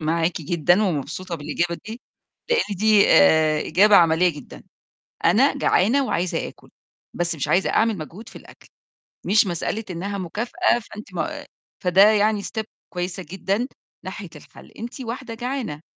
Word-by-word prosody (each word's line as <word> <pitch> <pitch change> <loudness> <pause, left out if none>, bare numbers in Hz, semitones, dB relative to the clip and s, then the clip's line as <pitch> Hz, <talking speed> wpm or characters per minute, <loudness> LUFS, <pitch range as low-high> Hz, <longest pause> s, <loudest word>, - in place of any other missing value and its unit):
معاكِ 165 +2 0
جدًا 175 +6 +2
ومبسوطة 170 +1 -3
بالإجابة 170 +3 -2
دي، 225 +3 -7 0.5
لإن 465 - +1
دي 215 +1 +4
آآ 155 -4 +5
إجابة 205 +2 +5
عمليّة 170 +1 +4
جدًا. 70 - -11 0.6
أنا - - +4
جعانة 260 +8 +2
وعايزة 175 -5 -1
آكُل، - - -15 0.4
بس 175 -1 -2
مش 140 - -3
عايزة 185 - +2
أعمل 225 -2 +2
مجهود 180 +8 -9
في - - -18
الأكل. - - -17 0.6
مش 210 +1 +4
مسألة 185 +5 -3
إنّها 195 +3 -4
مكافأة 240 - 0
فأنتِ 210 -4 -12
ما 170 - -4 0.4
فده 180 +1 +4
يعني 210 -1 +2
step 220 +1 -4 0.3
كويسة 180 +1 -4
جدًا 195 +6 -2 0.4
ناحية - - -7
الحَل، - - -15
أنتِ 240 +4 -8
واحدة 245 0 -6
جعانة. 240 - -4
190 Hz, 145 wpm, -22 LUFS, 170-220 Hz, 0.6 s, آآ